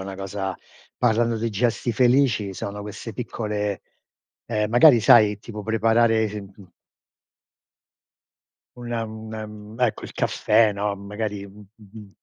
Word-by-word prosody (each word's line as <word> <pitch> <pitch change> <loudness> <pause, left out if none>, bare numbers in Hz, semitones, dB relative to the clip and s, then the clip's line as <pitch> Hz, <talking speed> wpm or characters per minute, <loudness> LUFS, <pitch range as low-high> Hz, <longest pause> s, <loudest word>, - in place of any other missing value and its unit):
è - - -6
una 95 - -6
cosa 95 -1 -4 0.4
parlando 115 +1 +2
di 115 +1 -2
gesti 115 +2 0
felici 120 -5 +2
sono 100 +3 -6
queste 105 +2 -7
piccole, 105 -4 -3 0.7
ehm, 105 -2 -1
magari 120 +2 +7
sai 105 -2 +5
tipo 105 -2 -8
preparare 115 +1 +2
sem 105 0 -6
mhmm 95 -3 -17 2.1
una 120 -1 -4
un 110 -1 -9
ecco 120 -3 0
il - - -9
caffè, 110 0 +2
no, 100 0 -2
magari, 100 0 -5
mh 100 +1 -15
mh 110 -3 -18
mhmm, 105 - -12
110 Hz, 135 wpm, -23 LUFS, 105-115 Hz, 2.1 s, magari